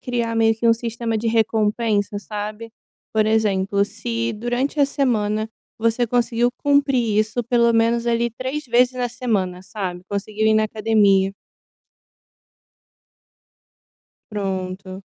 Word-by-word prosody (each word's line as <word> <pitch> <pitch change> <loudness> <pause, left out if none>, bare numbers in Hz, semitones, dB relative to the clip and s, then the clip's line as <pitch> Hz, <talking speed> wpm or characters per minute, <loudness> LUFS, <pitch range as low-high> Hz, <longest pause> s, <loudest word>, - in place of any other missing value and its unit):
criar 235 -2 -2
meio 225 0 +4
que 225 +2 -2
um - - +7
sistema 230 0 -3
de 225 - -3
recompensa, 220 -2 +1
sabe? 210 +2 -6 0.4
Por 215 -1 +2
exemplo, 200 -2 +2
se 230 +2 -3
durante 245 +6 -2
a - - +7
semana 220 -6 0 0.3
você 230 +2 +1
conseguiu 240 0 +1
cumprir 275 -7 +2
isso 215 +3 0
pelo 235 0 +3
menos, 230 +1 +2
ali, 235 0 +1
3 260 +6 -4
vezes 245 +1 +3
na 250 -1 -1
semana, 200 -7 -2
sabe, 185 -3 -5
conseguiu 210 +2 -2
ir 220 - +4
na 215 0 +3
academia. 210 -3 +2 3.0
Pronto. 190 -1 -4
225 Hz, 125 wpm, -21 LUFS, 210-235 Hz, 3.0 s, um